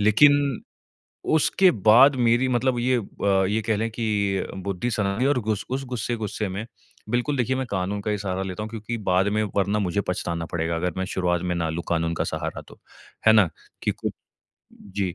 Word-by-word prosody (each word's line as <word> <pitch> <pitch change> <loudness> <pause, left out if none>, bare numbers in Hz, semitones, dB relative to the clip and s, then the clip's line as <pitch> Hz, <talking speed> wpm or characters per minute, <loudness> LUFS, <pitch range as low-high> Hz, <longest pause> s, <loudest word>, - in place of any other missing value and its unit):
लेकिन 140 +5 +4 0.7
उसके 180 +4 +4
बाद 120 +6 +6
मेरी 120 +1 +3
मतलब 125 0 +1
ये 125 +1 +2
अ, 95 -2 0
ये 110 +2 0
कह 110 -1 0
लें 115 +2 -1
कि 105 -4 -1
बुद्धि 100 +4 -3
सनकी 105 +2 0
और 140 -2 +2
गुस 110 -2 -2
उस 135 +1 -2
गुस्से-गुस्से 110 -4 -3
में 100 +4 -5 0.4
बिल्कुल 125 +4 0
देखिए, 130 +1 0
मैं 130 - -2
कानून 100 +1 -2
का 105 - -2
ही 105 - 0
सहारा 95 -1 -3
लेता 95 +2 -5
हूँ 110 - -4
क्योंकि 115 +1 -5
बाद 95 +2 +3
में 110 0 +1
वरना 100 +1 +2
मुझे 100 -1 0
पछताना 85 -2 -2
पड़ेगा 85 0 -1
अगर 90 +2 -1
मैं 95 - -1
शुरुआत 90 -2 0
में 90 -1 -1
ना 85 -2 -1
लूँ 85 +1 -3
कानून 85 0 0
का - - -1
सहारा - - -4
तो। - - -15 0.5
है 110 - +8
ना? 105 -6 +5 0.3
कि - - +1
कुछ - - -4 0.6
जी, 95 -3 -4
105 Hz, 195 wpm, -24 LUFS, 95-120 Hz, 0.7 s, है